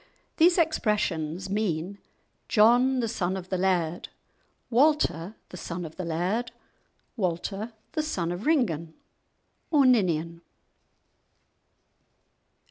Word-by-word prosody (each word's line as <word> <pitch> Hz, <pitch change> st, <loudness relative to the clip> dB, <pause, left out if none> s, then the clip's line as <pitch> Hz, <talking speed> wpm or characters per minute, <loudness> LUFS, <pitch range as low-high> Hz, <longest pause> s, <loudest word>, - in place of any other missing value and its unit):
These 345 Hz, +2 st, +5 dB
expressions 195 Hz, -, 0 dB
mean, 195 Hz, -2 st, -2 dB, 0.5 s
"John 245 Hz, +4 st, +4 dB
the 230 Hz, -, -1 dB
son 190 Hz, -4 st, -2 dB
of 185 Hz, -1 st, -8 dB
the 185 Hz, -, -1 dB
Laird," 180 Hz, -3 st, 0 dB, 0.6 s
"Walter 230 Hz, -, +2 dB
the 180 Hz, -, -9 dB
son 175 Hz, 0 st, -5 dB
of 160 Hz, -, -10 dB
the 185 Hz, -, -3 dB
Laird," 180 Hz, +9 st, -1 dB, 0.6 s
"Walter 195 Hz, +3 st, -3 dB, 0.2 s
the 310 Hz, -, -1 dB
son 180 Hz, -, -2 dB
of 180 Hz, +9 st, -5 dB
Ringan 170 Hz, -, +1 dB, 0.7 s
or 290 Hz, -4 st, +4 dB
Ninian." 170 Hz, -9 st, +2 dB
190 Hz, 105 wpm, -27 LUFS, 170-240 Hz, 0.7 s, These